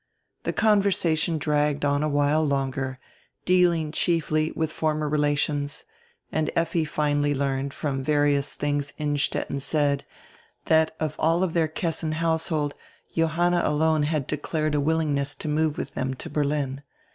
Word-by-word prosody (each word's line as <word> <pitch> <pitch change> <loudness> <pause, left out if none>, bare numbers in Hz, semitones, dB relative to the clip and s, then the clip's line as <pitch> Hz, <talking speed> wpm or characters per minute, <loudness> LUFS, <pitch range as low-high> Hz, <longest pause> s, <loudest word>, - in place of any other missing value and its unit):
The - - +1
conversation 180 -6 +2
dragged 150 -1 +1
on 145 0 +2
a 155 - +1
while 145 +2 +2
longer, 135 -2 -1 0.5
dealing 175 -4 +3
chiefly 155 -2 +1
widi 160 -1 -1
former 155 -1 -1
relations, 145 -1 0 0.5
and 155 -1 0
Effi 165 -1 +1
finally 145 -1 0
learned, 135 0 -1
from 135 -2 -3
various 145 -1 +2
tilings 145 -1 -2
Innstetten 145 -2 -1
said, 145 0 +1 0.6
diat 160 0 +4
of 155 - -2
all 165 +2 +2
dieir 170 -3 +1
Kessin 160 -1 -1
household 160 -2 0 0.4
Johanna 170 +2 +2
alone 155 +1 +2
had 150 -2 0
declared 155 +1 -2
a 145 - +2
willingness 145 -2 0
to 155 - -6
move 155 0 +1
widi - - -5
diem 130 0 -2
to - - -6
Berlin. 145 -2 -1
150 Hz, 135 wpm, -25 LUFS, 145-160 Hz, 0.6 s, diat